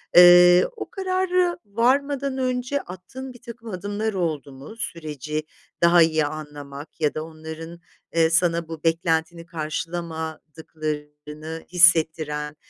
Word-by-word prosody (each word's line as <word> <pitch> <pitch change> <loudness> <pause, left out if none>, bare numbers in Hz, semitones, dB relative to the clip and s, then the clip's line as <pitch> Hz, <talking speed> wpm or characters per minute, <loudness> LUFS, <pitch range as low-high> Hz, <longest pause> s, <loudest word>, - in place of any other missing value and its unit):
Eee, 175 0 +9
o - - -7
kararı 370 -3 0
varmadan 270 +5 +1
önce 255 +2 -1
attığın 250 +9 -9
birtakım 235 -1 -11
adımlar 205 +3 -3
oldu 160 -7 -2
mu? 135 +10 -11
Süreci 155 - -4 0.4
daha 170 0 +7
iyi 160 -2 +3
anlamak 145 0 -8
ya 150 -2 +2
da 155 - -4
onların, 160 +1 -9 0.4
eee, 165 -1 +4
sana 170 0 +2
bu 165 -1 -8
beklentini 165 0 0
karşılamadıklarını 155 -1 -6
hissettiren 160 -4 +3
165 Hz, 110 wpm, -23 LUFS, 155-205 Hz, 0.4 s, Eee